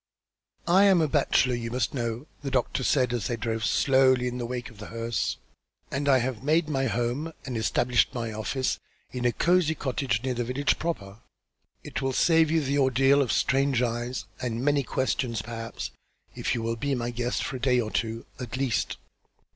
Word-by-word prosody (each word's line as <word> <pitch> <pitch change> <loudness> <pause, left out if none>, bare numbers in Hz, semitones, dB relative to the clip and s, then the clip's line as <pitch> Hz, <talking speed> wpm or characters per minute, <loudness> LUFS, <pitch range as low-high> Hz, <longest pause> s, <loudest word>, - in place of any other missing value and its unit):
"I 190 +4 +6
am 190 -3 +5
a 160 - +3
bachelor, 135 -3 +2
you 115 -1 -3
must 120 0 -1
know," 120 0 -3 0.2
the 140 - -3
doctor 130 0 0
said, 125 -2 +2
as 120 -4 -1
they 120 - -1
drove 115 0 -3
slowly 130 +2 +3
in 125 0 -3
the 120 - -3
wake 125 0 -5
of 110 - -17
the 105 - -7
hearse. 115 0 -2 0.5
"And 140 +1 0
I 135 - +6
have 125 -2 -2
made 155 +3 +2
my 135 -3 0
home 125 +8 -1
and 130 - -4
established 120 +2 +2
my 115 -4 -4
office 130 +5 -1 0.3
in 125 -1 -3
a 120 - +4
cosy 170 +2 +2
cottage 130 -5 -1
near 130 -1 0
the 120 0 -1
village 130 +4 0
proper. 105 -12 -4 0.6
It - - -4
will 135 0 0
save 160 +2 +4
you 160 0 +2
the 140 0 0
ordeal 135 +1 +4
of 130 - 0
strange 135 -1 +2
eyes, 120 +1 -2 0.2
and 120 0 -2
many 145 -1 +3
questions, 125 -3 -1
perhaps, 115 0 -6 0.4
if - - -1
you 115 - -2
will 115 0 -1
be 140 +3 -1
my 120 -1 -2
guest 120 +1 -2
for 130 - -3
a - - -12
day 125 -1 +3
or 110 -2 -2
two, 115 0 -2
at 125 -1 -5
least." 130 -5 0
125 Hz, 195 wpm, -27 LUFS, 115-140 Hz, 0.6 s, I